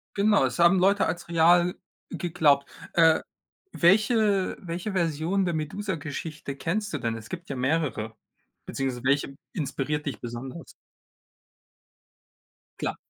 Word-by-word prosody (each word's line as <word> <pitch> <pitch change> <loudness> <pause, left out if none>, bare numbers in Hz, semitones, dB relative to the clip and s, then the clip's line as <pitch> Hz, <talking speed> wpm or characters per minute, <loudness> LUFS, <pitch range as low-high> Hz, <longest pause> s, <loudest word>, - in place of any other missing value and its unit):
Genau, 205 -5 +4
es 130 +5 -3
haben 170 +2 +6
Leute 200 +2 +3
als 170 +1 -4
real 175 +1 +4 0.4
geglaubt, 155 -5 +2 0.2
äh, 165 -1 +5 0.5
welche 205 +1 +3
welche 175 +3 -5
Version 170 +1 0
der 175 - -1
Medusa-Geschichte 155 -4 -4
kennst 205 +8 -2
du - - 0
denn? 115 -1 -2
Es 110 -1 -10
gibt 170 -3 -7
ja 135 - -3
mehrere. 130 -5 -1 0.5
Beziehungsweise, 130 -3 -3
welche 140 0 +1 0.2
inspiriert 150 -1 -2
dich 135 -7 -4
besonders? 125 +7 -7 2.1
Klar. - - -2
165 Hz, 120 wpm, -26 LUFS, 140-185 Hz, 2.1 s, haben